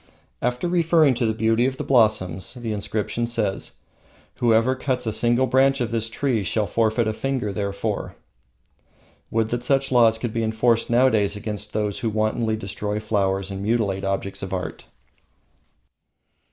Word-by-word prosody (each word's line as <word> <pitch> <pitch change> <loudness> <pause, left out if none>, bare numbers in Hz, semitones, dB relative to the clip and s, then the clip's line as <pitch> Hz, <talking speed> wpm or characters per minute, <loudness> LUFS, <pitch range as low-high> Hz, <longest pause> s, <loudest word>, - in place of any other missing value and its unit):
After 125 +7 -1
referring 165 -4 +3
to 120 -1 0
the - - +2
beauty 115 +2 +2
of 130 0 -3
the - - -3
blossoms, 110 -7 +1
the 120 -3 -4
inscription 105 +3 -2
says: 110 -5 -1 0.6
"Whoever 115 +1 +3
cuts 130 -1 -2
a 110 - -1
single 120 +3 +2
branch 135 +1 +3
of 120 -2 -2
this 115 -1 -1
tree 115 -2 -1
shall 105 +3 0
forfeit 110 +3 +1
a 110 - 0
finger 125 -4 -2
therefor." 100 -1 -3 1.1
Would 110 -1 0
that 120 +1 -2
such 135 +1 +1
laws 115 -3 +5
could 115 -1 -4
be 115 - -1
enforced 115 +1 +1
nowadays 120 -4 +3
against 105 0 -6
those 105 -2 -1
who 115 - -1
wantonly 110 +1 0
destroy 105 0 -4
flowers 100 -3 -1
and 95 0 -5
mutilate 100 -3 0
objects 95 0 -2
of 95 -1 -5
art! 90 - -6
110 Hz, 155 wpm, -23 LUFS, 105-120 Hz, 1.1 s, laws